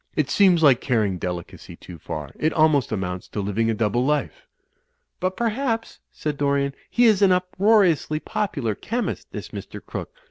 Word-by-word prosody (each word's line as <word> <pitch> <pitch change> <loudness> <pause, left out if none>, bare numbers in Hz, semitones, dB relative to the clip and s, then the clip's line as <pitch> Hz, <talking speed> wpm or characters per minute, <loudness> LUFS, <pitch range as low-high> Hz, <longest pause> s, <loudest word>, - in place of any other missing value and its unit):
It 145 -3 0
seems 185 -5 +4
like 135 -5 +6
carrying 105 -8 0
delicacy 90 -1 -6
too 85 -3 -12
far. 75 -2 -6
It 155 - +1
almost 155 -4 +3
amounts 90 -3 -3
to - - -5
living 105 +3 0
a 115 - +1
double 110 +3 +1
life." 150 +2 -1 0.7
"But, 185 +1 -2
perhaps," 230 0 -2
said 150 -2 -4
Dorian, 140 -1 +1 0.2
"he 245 - +3
is 215 -3 +4
an 195 -2 +6
uproariously 180 -3 +2
popular 155 - -2
chemist, 235 - -4
this - - -7
Mr. - - -8
Crooke. - - -7
150 Hz, 165 wpm, -23 LUFS, -, 0.7 s, like